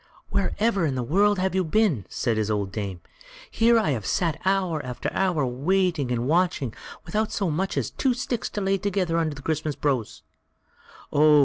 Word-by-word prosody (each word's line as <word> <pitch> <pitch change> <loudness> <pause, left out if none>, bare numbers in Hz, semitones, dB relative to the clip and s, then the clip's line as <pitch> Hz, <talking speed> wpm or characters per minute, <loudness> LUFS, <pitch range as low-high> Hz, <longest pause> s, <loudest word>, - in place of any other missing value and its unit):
"Wherever 200 0 +1
in 135 - -2
the 125 - -1
world 200 - +3
have 185 0 0
you 190 0 +2
been?" 165 - +1
said 115 - -1
his 110 -1 0
old 100 -2 -1
dame; 100 -4 -4 0.5
"here 230 +1 +4
have - - 0 0.2
I - - -5
sat 170 -5 0
hour 185 -5 +1
after 125 -1 -4
hour 175 -7 +1
waiting 150 +2 0
and 120 0 -1
watching, 165 -7 +1 0.3
without 215 0 -1
so 190 -5 0
much 190 +6 -1
as - - -1
two 260 -3 +1
sticks 245 -2 -2
to - - +1
lay 195 0 +1
together 185 -4 0
under 155 -3 -1
the 145 - -11
Christmas 155 -1 -1
brose." 130 -7 -2 0.9
"Oh!" 150 0 +6
165 Hz, 185 wpm, -25 LUFS, 135-195 Hz, 0.9 s, Oh